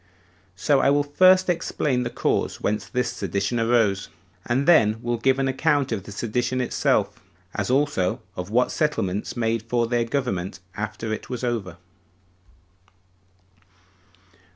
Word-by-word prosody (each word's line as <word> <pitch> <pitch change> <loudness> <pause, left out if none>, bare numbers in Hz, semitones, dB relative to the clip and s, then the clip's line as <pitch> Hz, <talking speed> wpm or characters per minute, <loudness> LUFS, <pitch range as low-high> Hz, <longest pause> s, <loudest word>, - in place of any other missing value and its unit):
So 135 +9 +2
I - - +3
will 145 +1 +3
first 185 +6 +5
explain 155 -6 0
the 120 - -2
cause - - -1
whence 105 -1 -2
this 125 +4 -1
sedition 100 +5 -2
arose, 115 -4 +2 0.4
and 130 +5 0
then 110 -10 +5
will 120 -1 -1
give 130 +3 +2
an 135 0 0
account 140 0 +1
of 100 -5 -3
the - - -9
sedition 120 +4 -1
itself; 125 - 0 0.3
as - - -2
also 130 -9 +1 0.2
of 90 +1 -5
what 125 +3 +2
settlements 105 -10 -1
made 115 -1 0
for 115 +1 0
their 120 0 0
government 100 -9 -2 0.2
after 105 +1 -4
it 110 - -6
was 125 -1 -5
over. 105 -8 -2
120 Hz, 140 wpm, -24 LUFS, 105-135 Hz, 0.4 s, first